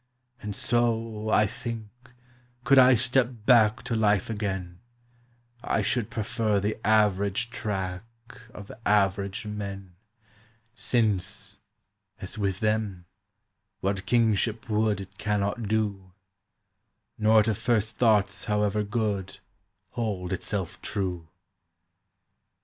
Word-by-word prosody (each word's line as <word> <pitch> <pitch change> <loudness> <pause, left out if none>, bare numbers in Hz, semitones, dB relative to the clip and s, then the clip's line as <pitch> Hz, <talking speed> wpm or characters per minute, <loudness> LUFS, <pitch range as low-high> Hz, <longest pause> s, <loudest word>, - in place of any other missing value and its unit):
And 105 -1 -5
so, 115 -2 0
I 105 - +4
think, 115 -1 -6 0.7
could 135 +1 +6
I 130 0 +7
step 125 +1 +2 0.2
back 115 -3 +5
To 115 - -2
life 105 -1 +2
again, 95 -4 -4 0.8
I 110 - 0
should 115 +2 0
prefer 110 -2 0
the 105 +2 -1
average 105 +1 +2
track 95 -5 -3 0.5
Of 100 -1 -10
average 100 0 +1
men, 100 -3 -6 0.8
Since, 105 -4 -1 0.6
as - - -7
with 100 -3 -2
them, 105 -4 -1 0.8
what 95 0 -2
kingship 110 -1 +1
would 105 -2 +1
It 95 0 -12
cannot 105 +1 -1
do, 100 -4 -2 1.1
Nor 110 0 +5
to 110 +1 +1
first 110 0 0
thoughts 105 -4 +2
however 105 0 +1
good 105 -3 -2 0.5
Hold 100 -6 -3
itself - - -4
true. 90 -6 -3
105 Hz, 105 wpm, -27 LUFS, 100-110 Hz, 1.1 s, I